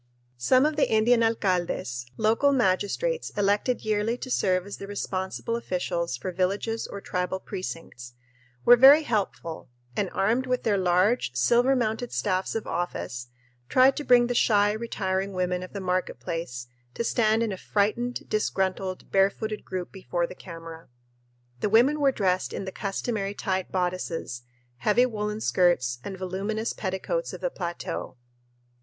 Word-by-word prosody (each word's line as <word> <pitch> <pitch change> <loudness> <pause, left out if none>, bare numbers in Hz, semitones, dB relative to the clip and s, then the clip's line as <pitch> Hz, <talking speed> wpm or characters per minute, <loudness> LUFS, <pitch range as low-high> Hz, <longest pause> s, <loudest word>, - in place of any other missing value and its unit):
Some 255 - +4
of 305 0 0
the 300 - +3
Indian 230 +2 +4
alcaldes, 180 - 0
local 225 +6 +3
magistrates 260 - 0
elected 205 +5 +1
yearly 215 +2 0
to 255 - -7
serve 185 -5 +1
as 200 - -7
the 195 - -8
responsible 195 +2 -3
officials 175 - -2
for 155 +9 -4
villages 200 +5 -1
or 200 - -7
tribal 180 0 -2
precincts, 165 -11 -7 0.5
were 245 - +9
very 275 +5 +8
helpful 200 - -3 0.3
and, 200 -3 0
armed 235 +7 +1
with 250 0 0
their 205 -3 +2
large, 185 - +2
silver 240 - +4
mounted 235 0 -1
staffs 185 0 -1
of 225 - -2
office, 125 -8 -3 0.4
tried 260 +1 +5
to 295 - -4
bring 245 -3 +5
the 245 - -1
shy, 205 -3 +4
retiring 200 -3 -2
women 180 -1 -1
of 185 - -8
the 200 - -5
market 185 -1 -1
place 165 -9 -4 0.3
to - - -1
stand 225 -1 +2
in 225 - -1
a - - -3
frightened, 215 +6 -1
disgruntled, 190 -3 -1
barefooted 200 +2 +1
group 185 -2 -5
before 180 -3 -2
the - - -8
camera. 165 -2 -10 0.7
The 205 - 0
women 250 +8 +4
were 280 -2 +4
dressed 185 -6 0
in - - -4
the 190 - -5
customary 200 +1 -3
tight 190 -2 -2
bodices, 180 -8 -2 0.4
heavy 240 - +3
woolen 210 -2 -3
skirts, 150 - +2
and 195 -1 -6
voluminous 195 +4 -2
petticoats 215 - -3
of - - -8
the - - -1
plateau. 170 - -5
200 Hz, 150 wpm, -26 LUFS, 180-230 Hz, 0.7 s, were